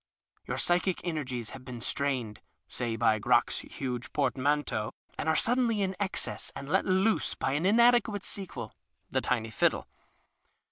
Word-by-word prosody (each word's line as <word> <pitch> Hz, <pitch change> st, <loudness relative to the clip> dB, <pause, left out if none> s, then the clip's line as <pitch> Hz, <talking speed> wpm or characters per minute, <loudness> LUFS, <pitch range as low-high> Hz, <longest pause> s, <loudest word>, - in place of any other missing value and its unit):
Your -, -, -2 dB
psychic 180 Hz, +1 st, +1 dB
energies 130 Hz, -9 st, -3 dB
have 130 Hz, -, -9 dB
been 125 Hz, -2 st, -7 dB
strained 125 Hz, -3 st, -1 dB, 0.3 s
(say 120 Hz, -2 st, -2 dB
by 110 Hz, -1 st, +3 dB
Crock's -, -, +3 dB
huge 125 Hz, -2 st, -5 dB
portmanteau), 135 Hz, -6 st, 0 dB, 0.2 s
and -, -, -2 dB
are 160 Hz, -, +3 dB
suddenly 235 Hz, -2 st, +2 dB
in 190 Hz, 0 st, -1 dB
excess 200 Hz, -2 st, -2 dB
and 135 Hz, -, -6 dB
let 150 Hz, -, +2 dB
loose 190 Hz, +4 st, +2 dB
by -, -, -1 dB
an 150 Hz, +6 st, +1 dB
inadequate 235 Hz, -2 st, +4 dB
sequel 185 Hz, -, -5 dB, 0.4 s
(the 130 Hz, -, +1 dB
tiny 115 Hz, -3 st, -1 dB
fiddle). 105 Hz, -, +1 dB
145 Hz, 145 wpm, -30 LUFS, 125-190 Hz, 0.4 s, inadequate